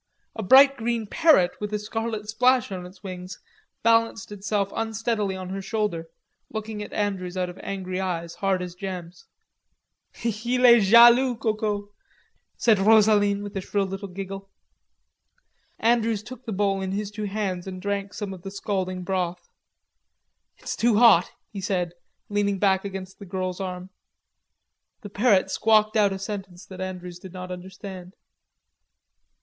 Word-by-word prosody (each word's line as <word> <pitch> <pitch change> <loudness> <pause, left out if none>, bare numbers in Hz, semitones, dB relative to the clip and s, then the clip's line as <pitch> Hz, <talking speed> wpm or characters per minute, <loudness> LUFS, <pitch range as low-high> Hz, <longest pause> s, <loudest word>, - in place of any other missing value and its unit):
A 220 - -4
bright 270 +7 +7
green 230 -1 -1
parrot 250 - +4
with 210 0 -3
a - - +1
scarlet 220 0 -4
splash 250 +1 +2
in 180 -2 -5
its 185 +3 -17
wings, 185 -1 -7 0.5
balanced 230 -1 +2
itself 200 0 -2
unsteadily 220 -2 -1
on 185 -1 -6
her 195 +1 -4
shoulder, 195 -5 -2 0.4
looking 220 -1 -5
at 210 - -7
Andrews 190 -3 -2
out 180 -1 -1
of 180 - -15
angry 185 -1 -4
eyes, 170 -3 -3
hard 190 -2 0
as 180 -1 -7
gems. 180 -2 -7 1.0
"Il 235 +3 0
est 235 -2 +8
jaloux, 240 +5 +7
Coco," 215 -2 -2 0.7
said 220 -4 +3
Rosaline, 205 -1 +4
with 205 -1 -8
a 195 - -2
shrill 200 +1 -1
little 195 +1 -5
giggle. 195 +1 -7 1.3
Andrews 225 -2 +1
took 255 +2 -11
the - - -2
bowl 195 -1 0
in 190 0 -3
his 205 0 -3
two 210 0 -5
hands 195 -3 -3
and 185 -1 -6
drank 200 +1 -3
some 205 -2 -4
of 185 - -10
the 195 - -6
scalding 190 -2 -3
broth. 180 -2 -3 1.1
"It's - - -5
too 235 -1 +2
hot," 215 -7 +6 0.2
he 200 - -5
said, 180 -3 -1 0.3
leaning 205 -1 0
back 190 -1 +2
against 190 -1 -7
the 200 - -10
girl's 185 0 -3
arm. 185 0 -6 1.1
The 205 -4 -9
parrot 205 -2 +3
squawked 215 -1 +3
out 205 -2 +4
a 195 - -3
sentence 190 -2 -7
that 185 -1 -9
Andrews 180 -2 -6
did 185 0 -11
not 185 0 -7
understand. 185 0 -9
200 Hz, 155 wpm, -25 LUFS, 185-215 Hz, 1.3 s, est